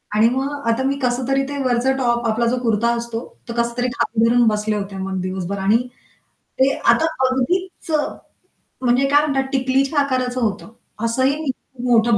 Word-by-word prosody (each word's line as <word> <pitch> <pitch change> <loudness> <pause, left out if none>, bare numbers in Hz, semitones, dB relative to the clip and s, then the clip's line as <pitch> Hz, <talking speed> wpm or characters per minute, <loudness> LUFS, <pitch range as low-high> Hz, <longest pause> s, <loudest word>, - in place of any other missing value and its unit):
आणि 220 +2 +5
मग 265 +3 -1 0.2
आता 230 +3 +1
मी 275 +1 0
कसंतरी 255 +2 0
ते 285 - -4
वरचं 255 +1 +1
टॉप 240 -2 +1
आपला 230 +2 +1
जो 250 +2 +1
कुर्ता 230 +1 +2
असतो, 235 -1 -4 0.3
तो - - -3
कसंतरी 235 +1 0
खाली 230 -1 +1
धरून 240 0 +4
बसले 210 0 +1
होते 200 -1 -4
मग 190 0 -3
दिवसभर 185 +1 -3
आणि 205 +4 +3 0.8
ते 270 +1 +4
आता 320 - +3 0.2
अगदीच 340 +7 -2 0.9
म्हणजे 250 +2 +3
काय 290 +1 +5
म्हणतात 270 -2 -1
टिकलीच्या 270 +2 +1
आकाराचं 255 -2 -1
होतं. 215 0 -2 0.3
असंही 265 +5 +1 0.3
मोठं 230 -2 +4
245 Hz, 160 wpm, -20 LUFS, 225-265 Hz, 0.9 s, आणि